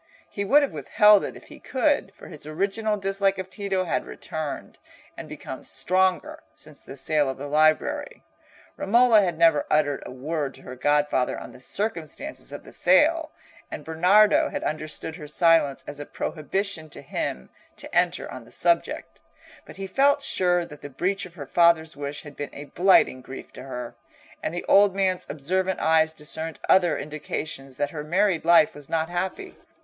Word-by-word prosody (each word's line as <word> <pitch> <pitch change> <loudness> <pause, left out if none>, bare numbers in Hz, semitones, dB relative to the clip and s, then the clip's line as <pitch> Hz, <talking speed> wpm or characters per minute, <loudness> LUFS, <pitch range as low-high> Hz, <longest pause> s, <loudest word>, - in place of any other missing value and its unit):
He 200 - -4
would 285 +8 +5
have 280 - -1
withheld 210 -2 +4
it - - -6
if - - -14
he - - -12
could; 275 -6 0
for - - -13
his 150 -3 -9
original 200 +6 -1
dislike 195 0 0
of 190 0 -6
Tito 195 -3 -1
had 175 - -1
returned, 155 -2 -6 0.4
and - - -9
become - - -8
stronger, 185 +1 0
since 155 -2 -8
the 135 - -11
sale 145 0 +2
of 135 - -4
the 140 - -6
library. 155 - +1 0.5
Romola 230 +1 +5
had 175 -4 -1
never 165 -3 +4
uttered 145 -2 +1
a - - -9
word 145 +2 -4
to 135 - -16
her 130 - -8
godfather 145 -1 +1
on - - -9
the - - -14
circumstances 205 - -4
of - - -8
the - - -14
sale, 320 +1 +3 0.4
and - - -7
Bernardo 180 +7 +4
had - - -4
understood 155 +1 -4
her 150 -4 -9
silence 165 -4 +3
as 145 - -8
a 145 - -6
prohibition 165 +1 -3
to - - -9
him 65 0 -4 0.2
to - - -9
enter - - +2
on - - -8
the - - -18
subject, - - 0 0.5
but - - -11
he 195 - -6
felt 280 +7 +2
sure 175 -5 +2
that 150 -3 -13
the 145 - -8
breach 185 +8 -2
of 170 - -20
her 145 -5 -7
father's 165 +1 +3
wish 145 0 -5
had 145 -2 -11
been 145 - -5
a 145 - -7
blighting 190 - +3
grief 130 +1 -10
to - - -9
her, 125 -3 -7 0.5
and - - -2
the 175 - -5
old 200 -1 +5
man's 190 -2 +1
observant 185 +6 -1
eyes 160 0 +3
discerned 160 +1 -5
other 180 -3 +4
indications 150 -2 -5
that 145 0 -1
her 150 -2 -5
married 185 +2 +1
life 190 +6 +5
was 145 -2 -12
not 160 -1 0
happy. 185 - -4
165 Hz, 180 wpm, -25 LUFS, 150-195 Hz, 0.5 s, would